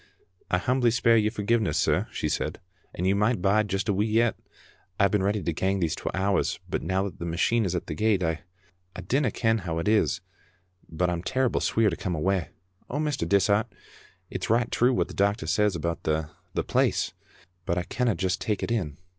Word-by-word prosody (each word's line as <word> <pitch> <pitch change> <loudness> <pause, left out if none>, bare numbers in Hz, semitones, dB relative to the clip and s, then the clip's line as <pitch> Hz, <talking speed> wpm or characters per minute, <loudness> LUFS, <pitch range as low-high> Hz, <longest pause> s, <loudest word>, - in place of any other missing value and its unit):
"I 90 - +2
humbly 120 +6 +2
speir 115 0 +3
your 105 -1 +3
forgiveness, 110 0 0
sir," - - +2
she - - -2
said, - - -2 0.2
" 85 - -23
and 90 - -2
you 95 +1 +3
micht 105 +2 +2
bide 100 +3 +2
just 95 +2 -2
a 105 - +2
wee 105 +3 +1
yet. 115 +1 +2 0.6
I've 100 -1 +4
been 105 - +2
ready 100 0 0
to 85 - -1
gang 95 +4 0
these 85 -3 0
twa - - -4
hours, 95 +1 +1
but - - -2
now 95 +4 0
that 100 - -6
the 85 - -4
machine 95 +7 +1
is 90 -1 -1
at 90 - -2
the 80 - -4
gate, 105 +2 +1
I 80 -1 0 0.6
dinna 135 -1 +1
ken 110 0 +1
how 85 -4 -4
it 85 - -2
is, 105 -3 +2 0.7
but 90 +2 0
I'm 85 -1 -2
terrible 130 +6 0
sweer 110 -3 +2
to - - -2
come 90 0 -3
awa'. 90 +1 0 0.4
Oh, 140 - -3
Mr. 150 -2 -1
Dishart, 100 +3 +3 0.6
it's 90 - -4
richt 115 +1 +2
true 125 +2 +4
what 125 - +1
the - - -10
doctor 100 +3 +1
says 105 -3 +2
about 85 0 -2
the 80 -2 -1
— - - -40
the - - +1
place, - - +1 0.5
but 85 - 0
I 90 - 0
canna 120 +2 0
just 95 0 -1
take 105 -2 -1
it - - -2
in. 85 -12 -1
100 Hz, 215 wpm, -26 LUFS, 90-110 Hz, 0.7 s, I've